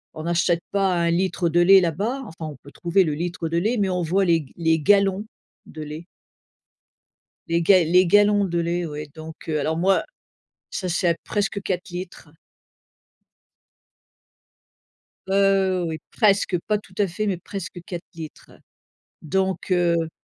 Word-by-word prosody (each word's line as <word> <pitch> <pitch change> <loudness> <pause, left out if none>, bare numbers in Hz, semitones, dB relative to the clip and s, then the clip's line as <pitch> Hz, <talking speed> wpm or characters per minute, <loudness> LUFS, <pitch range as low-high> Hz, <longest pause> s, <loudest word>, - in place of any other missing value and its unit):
on 155 - -6
n'achète 170 0 +1
pas 195 -2 +1
1 170 -1 +1
litre 175 0 0
de 175 - +2
lait 195 +2 +8
là-bas, 205 - -1
enfin 160 -2 -7
on - - -10
peut 140 - -14
trouver 175 +7 +2
le 155 - -1
litre 170 +1 -3
de 165 - -1
lait, 220 +8 +1
mais 195 -2 +1
on 180 -1 -1
voit 190 +4 +1
les 170 -2 +3
g - - -20
les 160 -1 +2
gallons 195 +4 +3 0.4
de 155 - -10
lait. 150 +2 -7 1.4
Les 170 0 +1
ga 185 +1 +5
les 180 +3 +4
gallons 205 +2 +4
de 175 -2 -2
lait 170 +1 -1
oui 150 0 -6
donc, 160 0 -9
heu, 155 - 0
alors 160 +3 -1
moi 190 +3 +2 0.7
ça 185 - -3
c'est 175 +1 +1
à 170 - +3
presque 200 -1 -2
4 185 -1 -3
litres. 175 -3 -8 3.0
Heu, 195 -1 +2
oui 160 -1 -4
presque, 200 -4 +2
pas 210 - +2
tout 205 -2 -15
à 205 - +3
fait 185 +5 -3
mais 195 -3 -1
presque 190 +1 -7
4 175 -2 -6
litres. 160 -2 -10 0.7
Donc, 190 +3 -1
heu 170 -2 +2
175 Hz, 165 wpm, -23 LUFS, 165-195 Hz, 3.0 s, lait